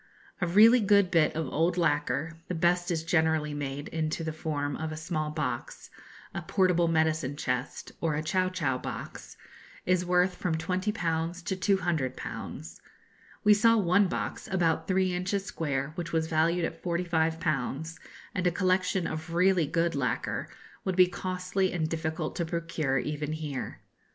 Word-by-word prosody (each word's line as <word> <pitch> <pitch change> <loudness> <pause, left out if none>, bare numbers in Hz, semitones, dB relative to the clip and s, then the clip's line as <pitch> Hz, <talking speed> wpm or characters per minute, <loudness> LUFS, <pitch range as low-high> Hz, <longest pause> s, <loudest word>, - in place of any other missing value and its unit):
A 175 - +2
really 220 +7 +7
good 200 -3 +4
bit 160 -4 +3
of 160 0 -1
old 170 +5 +1
lacquer 160 -1 0
(the 180 - -3
best 175 +2 +2
is 165 -2 -1
generally 160 -2 +1
made 145 0 -4
into 160 0 -2
the 160 -1 -3
form 145 -3 -2
of 160 0 -4
a 155 - -5
small 155 -1 -2
box, 145 -6 -4 0.4
a - - -3
portable 180 -3 +2
medicine 160 -3 +1
chest, 125 -2 -3
or 160 -3 +1
a 155 - -2
chow 185 +4 +1
chow 145 -9 -1
box) - - -7 0.5
is 180 0 +2
worth 180 +1 +3
from 175 -2 -1
20_l_. 175 -2 -1
to 190 - -1
200_l_. 165 - -2 0.6
We 210 - +7
saw 230 +2 +5
one 195 0 +4
box, - - -4
about 170 -4 +1
three 185 -1 +2
inches 185 +2 -1
square, 140 -5 -2
which 170 0 -5
was 160 -1 +1
valued 165 +2 +2
at 165 0 -6
45_l_.; 160 -3 -1 0.3
and 185 -2 0
a - - +3
collection 185 0 +1
of 160 +2 -4
really 180 -3 +4
good 165 +3 +1
lacquer 140 -3 -2 0.3
would 190 - -1
be 185 0 +7
costly 185 +1 -2
and 165 -3 -1
difficult 160 0 -3
to 170 - 0
procure 165 -4 -1
even 150 +2 -2
here. 150 -4 -5
165 Hz, 155 wpm, -29 LUFS, 155-180 Hz, 0.6 s, really